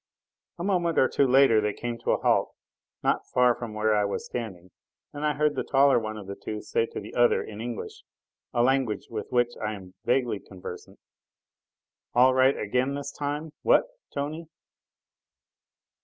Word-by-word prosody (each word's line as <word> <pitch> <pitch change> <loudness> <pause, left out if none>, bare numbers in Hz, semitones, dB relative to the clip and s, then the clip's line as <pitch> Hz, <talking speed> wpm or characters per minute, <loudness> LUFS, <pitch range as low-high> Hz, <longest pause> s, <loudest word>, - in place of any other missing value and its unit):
A 170 - -5
moment 175 -4 +1
or 130 - +5
two 140 - +2
later 130 -4 +5
they 105 -1 0
came 120 +1 -5
to - - -4
a - - +3
halt, - - +1 0.5
not - - +1
far 125 -1 +5
from 115 -3 -7
where 110 0 +2
I 105 - +3
was 100 - -2
standing, 95 -7 -6 0.4
and 145 - -6
I 150 -1 +2
heard 150 0 +2
the 135 - -2
taller 135 -2 +4
one 110 -1 -5
of 105 - -8
the 100 - -6
two 105 +2 -6
say 115 +2 0
to - - -6
the 105 - -10
other 120 0 +3
in 105 0 -8
English 120 -2 -6 0.5
a 120 - +2
language 130 -4 +1
with - - -5
which 120 -1 +2
I 105 0 -1
am 95 -2 -12
vaguely 125 -4 +1
conversant: 90 -2 -10 1.2
"All 130 +2 +6
right 130 +1 +4
again 125 +6 0
this 140 0 -5
time, 150 +2 -4
what, - - +4 0.2
Tony?" 155 +4 -4
120 Hz, 175 wpm, -27 LUFS, 110-140 Hz, 1.2 s, All